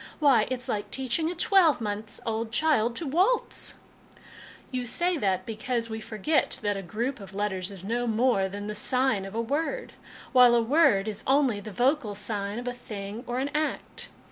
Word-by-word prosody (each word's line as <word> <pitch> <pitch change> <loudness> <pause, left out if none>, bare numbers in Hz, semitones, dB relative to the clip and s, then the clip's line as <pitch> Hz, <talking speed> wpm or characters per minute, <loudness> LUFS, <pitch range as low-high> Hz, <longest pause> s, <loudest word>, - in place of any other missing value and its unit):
Why, 270 -8 +4
it's 255 -1 -4
like 205 -1 -2
teaching 265 +7 0
a 355 - -4
twelve 345 -4 +4
months 210 0 -3
old 225 0 -2
child 240 -5 +2
to 335 - -4
waltz! 370 - +1 0.4
" - - -21
" - - -19
You 250 -1 -3
say 345 +9 +2
that 190 -6 0
because 230 +1 -3
we 220 0 -4
forget 220 +9 0
that 205 -1 +1
a 195 - -4
group 235 +9 -3
of 195 -1 -11
letters 190 -2 -1
is 195 -3 -10
no 240 +4 -1
more 225 -4 +2
than 205 +1 -6
the 210 - -4
sign 250 -1 +1
of 195 +2 -8
a 230 - +1
word, 320 - -2 0.4
while 250 -2 +7
a 235 - +4
word 225 -6 +4
is 215 0 -4
only 265 -5 +3
the 205 - -8
vocal 240 - +1
sign 205 0 -2
of 245 +1 -5
a 245 - -1
thing 215 -2 -7
or 245 +1 -2
an 275 +2 -1
act. 305 +1 -2
230 Hz, 195 wpm, -27 LUFS, 205-270 Hz, 0.4 s, while